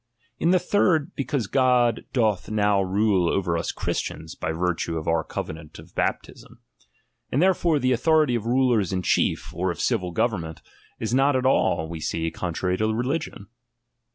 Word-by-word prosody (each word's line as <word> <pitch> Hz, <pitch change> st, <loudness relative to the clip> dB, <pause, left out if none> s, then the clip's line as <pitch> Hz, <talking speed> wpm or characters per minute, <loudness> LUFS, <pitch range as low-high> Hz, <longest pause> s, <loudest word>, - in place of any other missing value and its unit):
In 165 Hz, -, +2 dB
the 185 Hz, -, +5 dB
third, 180 Hz, -4 st, +1 dB
because 140 Hz, -4 st, -2 dB
God 125 Hz, 0 st, +2 dB
doth 105 Hz, -8 st, 0 dB
now 105 Hz, -2 st, +2 dB
rule 95 Hz, -2 st, +2 dB
over 90 Hz, -4 st, 0 dB
us 85 Hz, -, -2 dB
Christians, 80 Hz, 0 st, -4 dB
by -, -, -3 dB
virtue 85 Hz, 0 st, -1 dB
of 80 Hz, -, -6 dB
our 80 Hz, -1 st, +1 dB
covenant 80 Hz, 0 st, -7 dB
of -, -, -14 dB
baptism. -, -, -3 dB, 0.7 s
And 135 Hz, -, +1 dB
therefore 175 Hz, -3 st, +3 dB
the 130 Hz, -2 st, +2 dB
au -, -, +1 dB
thority 155 Hz, -1 st, +3 dB
of 115 Hz, -1 st, -3 dB
rulers 120 Hz, -6 st, +2 dB
in 95 Hz, -1 st, -2 dB
chief, -, -, 0 dB
or 95 Hz, +2 st, -1 dB
of 85 Hz, -, -4 dB
civil 100 Hz, -8 st, 0 dB
government, 85 Hz, -5 st, -2 dB, 0.3 s
03 110 Hz, -, -3 dB
not 135 Hz, +1 st, +3 dB
at 130 Hz, 0 st, 0 dB
all, 80 Hz, -10 st, +2 dB
we 85 Hz, 0 st, -6 dB
see, 80 Hz, +1 st, -2 dB
contrary 90 Hz, +1 st, -2 dB
to 110 Hz, +2 st, +1 dB
religion. 125 Hz, -2 st, -3 dB
110 Hz, 170 wpm, -24 LUFS, 85-130 Hz, 0.7 s, the